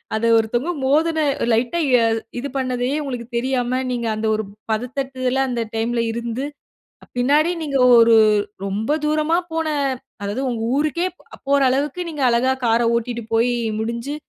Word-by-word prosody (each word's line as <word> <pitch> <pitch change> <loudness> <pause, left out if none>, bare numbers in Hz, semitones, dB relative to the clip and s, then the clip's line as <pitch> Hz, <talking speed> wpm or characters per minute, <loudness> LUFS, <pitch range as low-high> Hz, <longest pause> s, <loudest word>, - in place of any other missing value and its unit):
அத 220 +1 0
ஒருத்தவங்க 240 +8 0
மோதின 315 +4 +2 0.3
லைட்டா 240 +8 +1 0.2
எ - - +2 0.4
இது 280 - -4
பண்ணதையே 255 0 -1
உங்களுக்கு 250 -4 -5
தெரியாம, 255 0 0
நீங்க 235 -2 -2
அந்த 220 +1 -2
ஒரு 220 - -2 0.3
பதட்டத்ல 255 +2 -2
அந்த 240 -1 -2
டைம்ல 230 +1 0
இருந்து, 235 +3 -3 0.6
அ - - -23
பின்னாடி 295 +6 +3
நீங்க 280 -3 -1 0.2
ஒரு 230 0 +6 0.5
ரொம்ப 220 +10 -1
தூரமா 305 +2 +1 0.2
போன 325 0 -1 0.6
அதாவது, 205 +6 -3
உங்க 230 -2 -3
ஊருக்கே 310 +4 0 0.4
போற 280 0 +3
அளவுக்கு 280 +6 -1
நீங்க 295 -3 -4
அழகா 245 +3 +2
கார 230 0 +3
ஓட்டிட்டு 235 0 -3
போய் 235 +2 +3 0.3
முடுஞ்சு, 235 +5 -3
250 Hz, 145 wpm, -21 LUFS, 235-280 Hz, 0.6 s, ஒரு